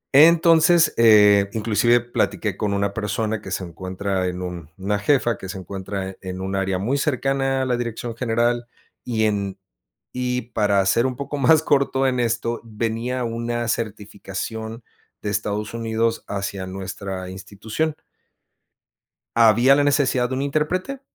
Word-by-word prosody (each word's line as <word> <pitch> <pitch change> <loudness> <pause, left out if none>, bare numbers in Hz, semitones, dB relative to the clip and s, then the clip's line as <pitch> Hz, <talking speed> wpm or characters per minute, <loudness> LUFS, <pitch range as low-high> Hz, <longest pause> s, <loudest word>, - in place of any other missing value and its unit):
Entonces, 165 +1 +6
eh, 105 -3 +6
inclusive 115 +2 +3
platiqué 110 -4 -1
con 105 -1 -1
una 100 0 0
persona 110 +1 -2
que 95 - -9
se 95 - -3
encuentra 95 +2 -3
en 90 0 -4
un 85 -4 -6
una 100 +2 -1
jefa 120 -1 +1
que 95 - -8
se 95 - -5
encuentra 95 +1 -5
en 95 -1 -6
un 95 +1 -3
área 95 -1 0
muy 125 +9 -1
cercana 135 -1 0
a - - -1
la 125 -1 0
dirección 120 -1 -4
general, 120 0 0 0.4
y 110 -3 -1
en, 100 -2 -1 0.6
y 125 0 -1
para 100 -3 +2
ser 115 +5 +3
un 130 - -1
poco 140 +2 -5
más 155 +4 +5
corto 135 -3 +2
en 125 -1 0
esto, 115 0 -1
venía 115 +3 -3
una 120 0 -2
certificación 110 +1 -5 0.4
de 105 - -3
Estados 105 +1 -2
Unidos 115 0 -1
hacia 100 -1 -4
nuestra 95 0 -6
institución. 105 +11 -4 1.4
¿Había 115 +3 +6
la 145 - +3
necesidad 135 -3 +2
de 130 - -2
un 135 - -2
intérprete? 180 - -1
115 Hz, 150 wpm, -22 LUFS, 100-125 Hz, 1.4 s, Entonces